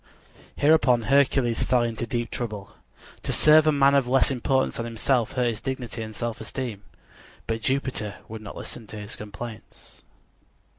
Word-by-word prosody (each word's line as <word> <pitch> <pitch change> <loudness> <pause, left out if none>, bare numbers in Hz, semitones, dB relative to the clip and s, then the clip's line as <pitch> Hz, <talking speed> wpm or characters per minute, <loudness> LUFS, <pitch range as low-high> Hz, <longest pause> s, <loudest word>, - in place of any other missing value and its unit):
_ - - -38 0.6
Hereupon 135 -6 +5
Hercules 135 -2 +3
fell 125 -2 +2
into 115 0 -3
deep 120 -2 -2
trouble. 105 -5 -5 0.5
To - - -2
serve 155 0 +6
a - - +6
man 140 -1 +4
of 140 -3 +3
less 135 +2 +3
importance 130 +1 0
than 115 - -3
himself 115 +1 0
hurt 125 -1 +1
his 115 -3 -1
dignity 125 -4 -4
and 110 -1 -7
self 120 0 -4
esteem; 110 -1 -5 0.6
but 115 0 -2
Jupiter 130 -6 -1
would 110 0 -8
not 105 - -9
listen 115 -3 -7
to 110 - -8
his 105 +1 -6
complaints. 105 +2 -10
120 Hz, 165 wpm, -25 LUFS, 110-130 Hz, 0.6 s, serve